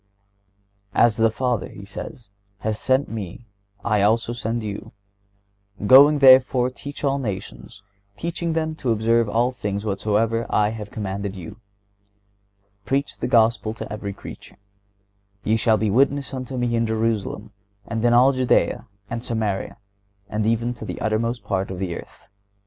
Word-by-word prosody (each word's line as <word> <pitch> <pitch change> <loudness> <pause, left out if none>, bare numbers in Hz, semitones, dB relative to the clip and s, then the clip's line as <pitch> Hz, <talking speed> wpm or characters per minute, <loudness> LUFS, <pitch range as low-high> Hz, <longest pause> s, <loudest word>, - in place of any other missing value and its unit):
"As 115 -2 +4
the 115 0 +4
Father," 120 -1 -1
He 100 - -11
says, 105 +2 -9 0.3
"hath 110 +1 -2
sent 130 +4 +1
Me, 110 0 -7 0.4
I 105 -3 +2
also 115 +3 +2
send 115 -1 -3
you."(117) 100 0 -11
"Going 140 +6 +8
therefore, 130 -2 +6
teach 140 +3 -9
all 140 -1 +1
nations, 100 -3 -6 0.3
teaching 170 0 -2
them 160 -1 -1
to 130 - -3
observe 115 0 +2
all 120 +4 +2
things 105 -4 -4
whatsoever 110 +3 0
I 105 0 +2
have 105 -2 -6
commanded 100 -1 -4
you."(118) 95 +2 -8 1.3
"Preach 135 +5 -1
the - - -1
Gospel 115 -2 +2
to 110 - -6
every 100 -1 -4
creature."(119) - - -11 0.9
"Ye 110 - +2
shall 110 0 +3
be 105 -1 0
witnesses 140 +4 +2
unto 130 0 -5
Me 120 -1 0
in 115 0 +1
Jerusalem, 110 -1 -2 0.3
and 115 0 -3
in 120 - +4
all 125 +3 +6
Judea, 130 -1 +1 0.2
and 115 +2 -5
Samaria, 110 -5 -2 0.5
and 105 0 -1
even 115 +2 +1
to 120 - -10
the - - -5
uttermost 115 +1 -1
part 95 -1 -2
of 95 - -5
the 90 -2 -3
earth." - - -12
115 Hz, 150 wpm, -23 LUFS, 105-125 Hz, 1.3 s, Going